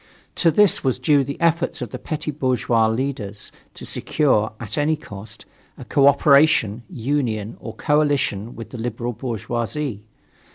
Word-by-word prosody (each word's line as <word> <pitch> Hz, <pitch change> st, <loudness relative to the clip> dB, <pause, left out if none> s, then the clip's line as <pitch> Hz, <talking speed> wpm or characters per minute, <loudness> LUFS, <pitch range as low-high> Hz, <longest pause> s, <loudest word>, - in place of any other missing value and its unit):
To 170 Hz, -, +3 dB
this 205 Hz, +4 st, +4 dB
was 130 Hz, -3 st, +1 dB
due 145 Hz, -3 st, +3 dB
the 140 Hz, +1 st, -6 dB
effort 170 Hz, 0 st, +1 dB
of 125 Hz, -4 st, -5 dB
the -, -, -6 dB
petty 155 Hz, -1 st, -4 dB
bourgeois 125 Hz, -5 st, +1 dB
leaders 110 Hz, -4 st, -3 dB, 0.2 s
to -, -, -9 dB
secure, 130 Hz, -8 st, +1 dB
at 110 Hz, -2 st, -5 dB
any 150 Hz, +2 st, +2 dB
cost, 105 Hz, -8 st, -11 dB, 0.3 s
a -, -, -9 dB
cooperation, 140 Hz, -5 st, +4 dB
union, 115 Hz, -4 st, -2 dB
or 110 Hz, -, -8 dB
coalition 145 Hz, -8 st, 0 dB
with 115 Hz, -, -9 dB
the 125 Hz, -, -7 dB
liberal 120 Hz, +1 st, -3 dB
bourgeoisie. 120 Hz, +1 st, -3 dB
130 Hz, 140 wpm, -22 LUFS, 110-145 Hz, 0.3 s, this